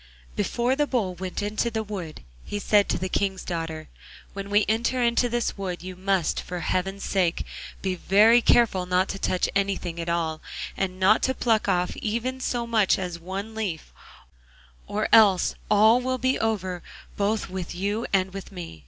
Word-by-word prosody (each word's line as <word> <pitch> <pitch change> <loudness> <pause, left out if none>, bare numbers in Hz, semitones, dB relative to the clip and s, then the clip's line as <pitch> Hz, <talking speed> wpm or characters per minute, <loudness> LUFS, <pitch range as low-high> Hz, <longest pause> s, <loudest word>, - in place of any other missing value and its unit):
Before 240 - 0
the 295 +1 +1
Bull 215 -9 0
went 185 +3 -5
into 215 +3 -1
the 220 -1 -2
wood, 190 -7 -7 0.2
he 205 - -4
said 205 0 +3
to - - +1
the 185 +1 -2
King's 190 0 -1
daughter: 165 -2 -4 0.5
'When 200 0 -6
we 205 +1 +3
enter 235 +4 +1
into 235 +1 +2
this 240 -3 -2
wood 180 -3 -4
you 185 0 -7
must, 190 -2 0
for 180 -1 -6
Heaven's 195 +3 -2
sake, 180 -3 0 0.4
be 190 -1 0
very 215 +6 +5
careful 205 -7 +3
not 180 +1 +2
to 195 - -4
touch 185 - 0
anything 195 -4 -1
at 170 0 -3
all, 165 -2 -1 0.3
and 185 -1 -3
not 190 +2 +5
to 260 - +1
pluck 225 -4 +1
off 180 -2 +1
even 235 +4 -2
so 240 -2 -1
much 220 -4 +3
as 180 -2 -4
one 195 +5 -6
leaf, 200 -8 -4 0.9
or 215 +1 -1
else 200 -5 +6 0.2
all 220 +4 +5
will 255 +1 -1
be 260 +1 +1
over 190 -5 -1 0.3
both 205 +2 0
with 185 -2 -5
you 205 +5 -2
and 190 -1 +1
with 195 0 -8
me. 175 - -8
195 Hz, 180 wpm, -25 LUFS, 180-220 Hz, 0.9 s, else